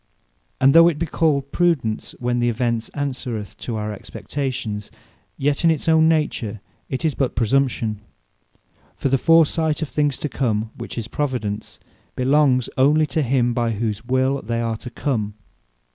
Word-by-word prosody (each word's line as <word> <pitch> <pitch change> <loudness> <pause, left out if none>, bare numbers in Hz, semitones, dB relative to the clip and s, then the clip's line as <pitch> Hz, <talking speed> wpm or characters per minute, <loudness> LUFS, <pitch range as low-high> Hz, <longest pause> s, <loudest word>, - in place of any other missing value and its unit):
And 135 +1 +5
though 165 0 +8
it 170 -4 +1
be 165 - -1
called 145 -3 0
Prudence, 155 -11 0
when 120 0 -1
the 120 0 +2
Event 115 -1 -1
answereth 125 -7 -4
our 105 -2 -2
Expectation; 115 -1 -4 0.6
yet 140 +2 0
in 165 - +5
its 160 -1 0
own 160 0 +5
nature, 145 -9 0 0.3
it 130 +5 -3
is 155 - +2
but 135 -2 -1
Presumption. 115 -3 +1 0.9
For 135 - -1
the 135 0 +2
foresight 160 0 +3
of 150 - -5
things 145 -3 0
to - - -3
come, 110 -6 -1
which - - -8
is 115 -2 -3
Providence, 115 -7 -3 0.4
belongs 130 -1 +3
onely 150 +4 +5
to 160 - +2
him 125 -2 +1
by 115 -1 0
whose 110 0 -2
will 130 +2 +1
they 115 +1 -2
are 115 -1 -1
to 125 - -8
come. 115 -5 -2
130 Hz, 160 wpm, -22 LUFS, 115-145 Hz, 0.9 s, though